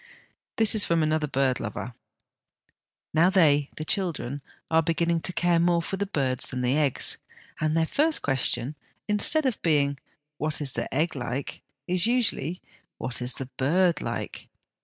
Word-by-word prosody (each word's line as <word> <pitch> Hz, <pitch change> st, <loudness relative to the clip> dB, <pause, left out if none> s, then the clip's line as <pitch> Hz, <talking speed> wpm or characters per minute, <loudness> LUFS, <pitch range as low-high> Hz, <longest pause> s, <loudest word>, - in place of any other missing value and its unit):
This 220 Hz, -2 st, +4 dB
is 215 Hz, -2 st, +4 dB
from 165 Hz, -1 st, +1 dB
another 155 Hz, 0 st, 0 dB
bird 135 Hz, -2 st, 0 dB
lover: 120 Hz, +2 st, -5 dB, 0.6 s
" -, -, -42 dB
Now, 165 Hz, +3 st, +4 dB
they 150 Hz, -7 st, +3 dB
(the 155 Hz, -, -5 dB
children) 155 Hz, -, -1 dB, 0.3 s
are 160 Hz, 0 st, +5 dB
beginning 165 Hz, +1 st, 0 dB
to 170 Hz, -, +1 dB
care 175 Hz, -1 st, +2 dB
more 170 Hz, 0 st, +3 dB
for 195 Hz, -, -3 dB
the 200 Hz, +1 st, -2 dB
birds 135 Hz, -8 st, 0 dB
than 125 Hz, -1 st, -3 dB
the 125 Hz, +2 st, +1 dB
eggs, 145 Hz, -4 st, +1 dB, 0.4 s
and 155 Hz, +1 st, 0 dB
their 165 Hz, -, +3 dB
first 305 Hz, -, +1 dB
question, 135 Hz, 0 st, +1 dB, 0.3 s
instead 215 Hz, +9 st, +3 dB
of 255 Hz, -5 st, -1 dB
being, 140 Hz, -4 st, +1 dB, 0.2 s
* 150 Hz, 0 st, -58 dB
What 155 Hz, 0 st, -1 dB
is 140 Hz, -3 st, -2 dB
the -, -, -4 dB
egg 155 Hz, +4 st, 0 dB
like? 130 Hz, +1 st, -5 dB
' 140 Hz, 0 st, -61 dB
is 185 Hz, +3 st, +6 dB
usually 220 Hz, -, +1 dB, 0.2 s
' -, -, -43 dB
What 125 Hz, -1 st, -3 dB
is 125 Hz, +1 st, -2 dB
the 135 Hz, -, -5 dB
bird 170 Hz, +4 st, +2 dB
like -, -, -5 dB
155 Hz, 180 wpm, -26 LUFS, 140-175 Hz, 0.6 s, is